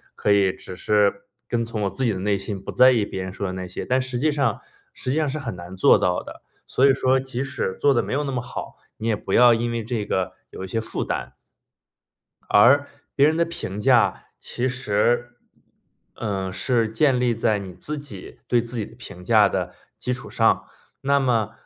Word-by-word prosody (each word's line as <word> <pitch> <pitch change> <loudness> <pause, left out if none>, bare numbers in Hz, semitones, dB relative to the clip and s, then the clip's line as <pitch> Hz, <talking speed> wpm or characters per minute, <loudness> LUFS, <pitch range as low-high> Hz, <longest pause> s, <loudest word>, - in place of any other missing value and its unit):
可 105 - 0
以 100 -2 +4
只 95 - -9
是 100 0 +2 0.3
跟 115 -1 0
从 115 -2 -4
我 100 - +1
自 100 +8 -4
己 115 - +2
的 95 - -4
内 100 +1 +1
心 100 0 -5
不 - - -10
在 130 +1 +6
意 115 -5 +2
别 95 -2 -5
人 95 - -5
说 100 +1 -4
的 95 - -4
那 95 0 -5
些。 90 - -6
但 130 +1 +1
实 130 -1 -4
际 155 +4 +2
上 140 -7 0 0.3
实 130 - -4
际 145 - 0
上 155 -1 +1
是 155 +3 -3
很 115 -8 -5
难 90 +1 -10
做 - - +6
到 90 0 0
的。 - - -11 0.3
所 130 - +2
以 140 - +6
说 130 0 +2
即 130 -1 -4
使 130 -8 -3
做 145 -1 +4
得 120 - +1
没 - - -6
有 145 +2 0
那 135 - -3
么 125 - -1
好， - - -7 0.2
你 110 - -4
也 110 - +2
不 - - -7
要 120 -1 +7
因 120 +1 -1
为 115 0 -2
这 110 -2 -3
个 95 -3 -1 0.2
有 - - -8
一 - - -8
些 115 +4 -2
负 110 - -4
担。 - - -4 1.1
而 135 +7 +6 0.3
别 140 +1 +5
人 160 +1 +1
的 170 - +3
评 105 - -5
价 125 +1 +3
其 125 - -3
实， 120 -1 0 0.8
呃， 95 -3 -3
是 115 +3 +1
建 130 +3 +2
立 125 -1 +2
在 110 -1 +1
你 95 -2 -8
自 150 +11 -6
己 145 -1 -10
对 120 -1 +3
自 120 +1 -5
己 110 - -2
的 115 - -15
评 100 -7 -10
价 105 -2 +5
的 - - -3 0.2
基 125 - -2
础 130 - -7
上。 - - +2 0.4
那 140 +1 +2
么， 115 -5 +1
115 Hz, 240 characters per minute, -23 LUFS, 100-130 Hz, 1.1 s, 要